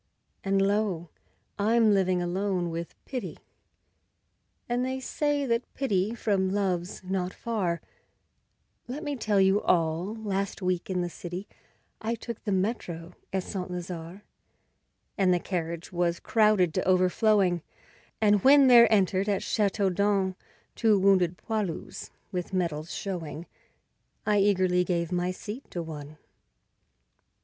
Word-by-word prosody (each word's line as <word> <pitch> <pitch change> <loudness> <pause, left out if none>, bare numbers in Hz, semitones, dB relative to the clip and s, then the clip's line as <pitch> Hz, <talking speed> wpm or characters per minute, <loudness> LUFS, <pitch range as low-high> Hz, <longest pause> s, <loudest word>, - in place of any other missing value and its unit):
And 195 0 +1
lo! 195 -4 0 0.5
I'm 220 +1 +4
living 185 -2 +2
alone 180 -1 -1
with 165 +1 -5
'Pity', 255 -3 -5 1.3
And 245 +1 0
they 260 +1 -2
say 290 +2 -1
that 235 -1 -1
pity 215 -4 0
from 195 -4 +1
love's 185 -2 -1
not 185 -1 -2
far; 190 -8 -2 1.1
Let 275 +6 -5
me 290 -2 -2
tell 210 -5 +1
you 190 +1 +4
all: 170 +4 +1
last 200 -3 -3
week 180 -2 -1
in 185 -1 0
the 175 - -1
city 180 +4 -7 0.5
I 230 +1 -1
took 230 0 -7
the 205 - -2
metro 185 -4 -2 0.2
at 190 -1 -1
Saint 185 -2 -5
Lazare; 180 +1 -6 1.0
And 190 -2 +4
the 180 - +3
carriage 170 -1 -4
was 170 -1 0
crowded 210 -7 +3
to 185 - -1
overflowing, 185 0 +3 0.6
And 205 -2 +3
when 280 +1 +7
there 240 -3 +8
entered 195 -1 +2
at 200 -2 0
Chateaudun 200 -1 +1 0.4
Two 220 -3 +3
wounded 185 -3 +3
'poilus' 210 -7 -4 0.2
with 180 0 -4
medals 170 -3 -1
showing, 170 -4 -5 0.8
I 210 -1 +3
eagerly 185 -3 +3
gave 170 -2 -1
my 180 0 0
seat 210 +7 -7
to 175 - -4
one. 150 -2 -8
190 Hz, 130 wpm, -28 LUFS, 180-210 Hz, 1.3 s, there